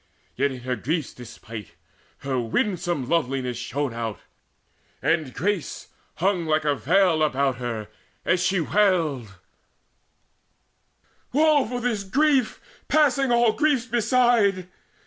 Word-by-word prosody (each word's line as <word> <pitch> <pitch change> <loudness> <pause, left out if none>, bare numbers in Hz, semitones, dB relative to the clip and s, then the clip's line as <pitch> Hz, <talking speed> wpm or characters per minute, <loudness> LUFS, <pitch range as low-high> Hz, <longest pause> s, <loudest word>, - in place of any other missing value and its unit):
Yet, 140 +2 +1
in 130 -2 -8
her 125 0 -2
griefs 150 +5 -3
despite, 115 -4 -10 0.5
Her 135 -2 -1
winsome 175 - -1
loveliness 130 -6 -1
shone 135 +1 -3
out, 115 -2 -4 0.8
and 160 -4 0
grace 180 - -3 0.3
Hung 180 -1 0
like 155 0 +1
a 145 - +3
veil 170 +3 +2
about 140 -3 +1
her, 115 -4 -4 0.4
as 185 - +2
she 190 +1 +1
wailed: 160 - +1 2.0
"Woe 300 -1 +3
for 245 +1 -4
this 230 -4 -1
grief 270 +3 +1 0.3
passing 275 -4 +3
all 235 -2 +4
griefs 295 -6 +1
beside! 235 -5 +2
170 Hz, 115 wpm, -24 LUFS, -, 2.0 s, all